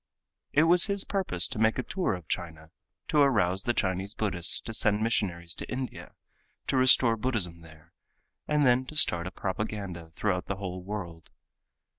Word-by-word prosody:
It 150 - +4
was 170 +1 +5
his 200 -1 0
purpose 185 - 0
to - - -6
make 110 0 +2
a 125 - -1
tour 185 - -1
of 90 -3 -11
China, 80 -3 -5 0.4
to 150 - +2
arouse 95 -10 +2
the 120 - +1
Chinese 95 +2 -2
Buddhists 90 -5 +1
to 115 - -7
send 105 -1 +2
missionaries 90 -7 -1
to - - -7
India 130 0 -6 0.5
to - - -1
restore 130 -2 +6
Buddhism 105 -8 -2
there, 80 -2 -17 0.5
and 150 -1 +2
then 125 0 +4
to 155 - -9
start 85 - +4
a - - -6
propaganda 95 -4 -5
throughout 90 +2 -2
the 100 - -2
whole 90 -2 -6
world. 90 -5 -7
100 Hz, 170 wpm, -28 LUFS, 90-125 Hz, 0.5 s, restore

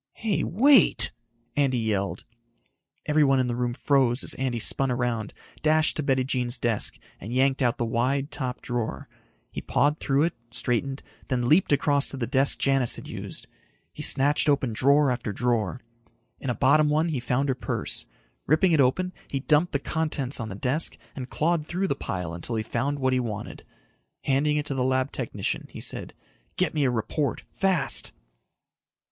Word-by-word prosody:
"Hey, 220 -4 -1
wait!" 215 - +4 0.4
Andy 135 -3 +2
yelled. 105 -4 -2 0.8
Everyone 145 -3 +3
in 130 - +2
the 120 -1 -2
room 120 -1 -2
froze 135 -3 +2
as - - +1
Andy 130 -2 -2
spun 135 +4 0
around, 120 -4 -1 0.3
dashed 155 0 +3
to - - -1
Bettijean's 130 -2 0
desk 120 -3 +1 0.2
and 105 - -8
yanked 135 +2 +2
out 120 -2 +1
the 120 - -1
wide, 130 +5 0
top 130 -4 -4
drawer. 120 -2 -3 0.4
He - - -5
pawed 145 +2 +1
through 140 +1 +1
it, 170 - 0 0.2
straightened, 130 +3 -2 0.2
then 125 -2 -1
leaped 160 +6 +4
across 145 0 +2
to 135 - -2
the 120 - -2
desk 135 +2 +3
Janis 135 -3 +3
had - - -9
used. - - -7 0.5
He - - -8
snatched 145 +2 +3
open 135 -5 +1
drawer 140 +4 +3
after 120 -3 -3
drawer. 120 +1 -1 0.6
In 135 - -4
a 125 - 0
bottom 150 +3 +4
one 155 +3 +1
he 145 -5 -1
found 125 +3 0
her 135 - +2
purse. 125 - -2 0.4
Ripping 160 +5 +3
it 155 -3 +4
open, 180 +8 +1
he 135 - -3
dumped 155 +4 +2
the 140 - +1
contents 150 -3 -1
on 115 -1 -4
the 100 - -6
desk 130 +10 +2 0.2
and 130 -2 -6
clawed 165 0 0
through 180 +5 -2
the 140 - 0
pile 90 -8 -4
until 85 +7 -5
he 110 - -1
found 135 +6 -2
what 130 -1 +1
he 130 - +2
wanted. 110 -4 -5 0.6
Handing 150 +2 +1
it 150 - -1
to 145 - -2
the 130 -1 -1
lab 130 +1 0
technician, 105 -6 -3
he - - -10
said, - - -5 0.4
"Get - - 0
me 150 -3 +1
a - - +3
report. 125 +4 -2
Fast." 190 -5 0
135 Hz, 175 wpm, -26 LUFS, 120-150 Hz, 0.8 s, wait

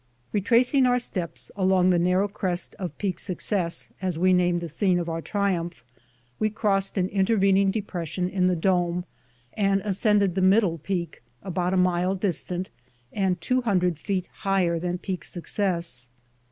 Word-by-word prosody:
Retracing 245 +6 +3
our 245 0 +3
steps 180 -9 -4
along 185 -1 +3
the 175 - +3
narrow 180 +3 +2
crest 185 -3 -3
of 180 -3 -5
Peak 195 -3 -2
Success, 180 -2 -2
as 185 -4 -1
we 185 +2 +4
named 175 -1 +2
the 170 - -4
scene 180 +3 +1
of 175 -1 -2
our 165 0 -3
triumph, 175 - -2 0.6
we 215 - +2
crossed 200 -2 0
an 185 -1 +2
intervening 195 -1 +3
depression 180 -4 -3
in 185 -1 +1
the 180 - +2
dome, 175 0 +1 0.5
and 195 -1 +2
ascended 205 -1 +2
the 190 - -1
middle 190 -3 +3
peak, 175 +1 -4 0.2
about 180 -1 -1
a - - +2
mile 180 +1 +2
distant 185 -1 -2 0.4
and 190 -4 0
two 255 +5 +1
hundred 180 -8 +1
feet 185 0 -2
higher 190 -4 +1
than 180 +1 -2
Peak 185 0 -5
Success. 170 - -2
185 Hz, 155 wpm, -25 LUFS, 175-200 Hz, 0.6 s, we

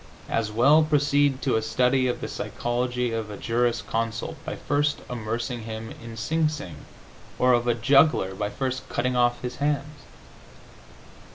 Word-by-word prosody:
As 110 -2 -1
well 135 +8 +5
proceed 145 -3 +2
to 130 -5 +2
a - - 0
study 125 +3 +2
of 125 - -2
the - - -3
psychology 125 0 -2
of 110 -2 -3
a 105 - -7
juris 120 +2 0
consult 115 0 -3
by - - -4
first 145 +1 0
immersing 115 +1 -3
him 110 0 -6
in 115 -1 -9
Sing 155 +7 +1
Sing, 90 - -8 0.5
or 125 0 +4
of 120 0 +2
a 120 - +3
juggler 135 -4 +4
by 105 +2 -2
first 130 +2 -4
cutting 125 +1 -1
off 120 0 +2
his 125 0 -4
hands. 145 +1 -1
125 Hz, 160 wpm, -25 LUFS, 115-140 Hz, 0.5 s, well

